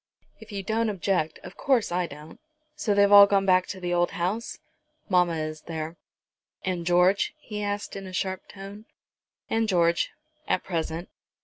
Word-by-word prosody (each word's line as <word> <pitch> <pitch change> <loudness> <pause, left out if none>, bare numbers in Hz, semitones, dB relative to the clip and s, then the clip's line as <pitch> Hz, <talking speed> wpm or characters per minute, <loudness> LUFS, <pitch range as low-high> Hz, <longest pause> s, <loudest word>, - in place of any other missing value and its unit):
"If - - -13
you 200 -1 -4
don't 225 +2 0
object, 185 -5 -1
of - - -10
course 255 -8 +2
I 175 0 0
don't. 150 +1 -12 0.4
So 240 -9 0
they've 200 0 +5
all 200 0 +10
gone 195 -1 +2
back 185 -1 +4
to 190 - -6
the 175 -1 -2
old 175 0 +2
house?" 200 +7 -2 0.5
"Mamma 180 -3 +3
is 155 0 -4
there." 160 0 -4 0.7
"And 180 -2 -2
George?" 180 - +3
he 210 -8 -6
asked 205 0 -3
in 195 -1 -6
a 185 - -9
sharp 190 +1 -3
tone. 200 +2 -10 0.6
"And 225 0 +1
George, 170 -2 +2 0.4
at - - +1
present." 165 -1 -3
185 Hz, 170 wpm, -26 LUFS, 175-205 Hz, 0.7 s, all